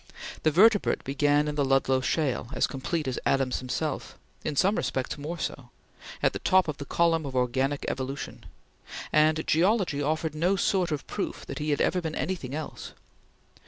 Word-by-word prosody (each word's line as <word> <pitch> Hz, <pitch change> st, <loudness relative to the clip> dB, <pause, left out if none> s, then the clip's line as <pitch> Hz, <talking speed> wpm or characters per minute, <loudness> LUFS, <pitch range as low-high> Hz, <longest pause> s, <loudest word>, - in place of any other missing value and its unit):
The 155 Hz, -, +3 dB
vertebrate 205 Hz, +6 st, +4 dB
began 145 Hz, +2 st, +2 dB
in 150 Hz, -, -1 dB
the 145 Hz, -1 st, +1 dB
Ludlow 135 Hz, -1 st, +2 dB
shale, 130 Hz, -3 st, -1 dB
as -, -, +2 dB
complete 150 Hz, +3 st, -3 dB
as 130 Hz, -, -2 dB
Adams 135 Hz, -2 st, +1 dB
himself 135 Hz, +3 st, -3 dB, 0.3 s
in 150 Hz, -, -2 dB
some 195 Hz, +8 st, +3 dB
respects 130 Hz, -9 st, -2 dB
more 150 Hz, +4 st, -5 dB
so 135 Hz, -5 st, -5 dB, 0.5 s
at -, -, +3 dB
the -, -, -4 dB
top 185 Hz, -1 st, +3 dB
of 150 Hz, -2 st, -3 dB
the 140 Hz, -, -6 dB
column 165 Hz, +1 st, +2 dB
of 135 Hz, -2 st, -6 dB
organic 130 Hz, +3 st, 0 dB
evolution: 135 Hz, +1 st, -5 dB, 0.7 s
and 155 Hz, +1 st, +3 dB
geology 175 Hz, -3 st, +2 dB
offered 155 Hz, +1 st, -1 dB
no 175 Hz, +5 st, +1 dB
sort 185 Hz, -3 st, +1 dB
of 150 Hz, -1 st, -3 dB
proof 200 Hz, -, -4 dB
that -, -, -6 dB
he 150 Hz, +1 st, -2 dB
had 145 Hz, -, +1 dB
ever 180 Hz, -, +2 dB
been 160 Hz, -2 st, -4 dB
anything 145 Hz, -8 st, -3 dB
else. 155 Hz, 0 st, -6 dB
150 Hz, 175 wpm, -27 LUFS, 135-165 Hz, 0.7 s, vertebrate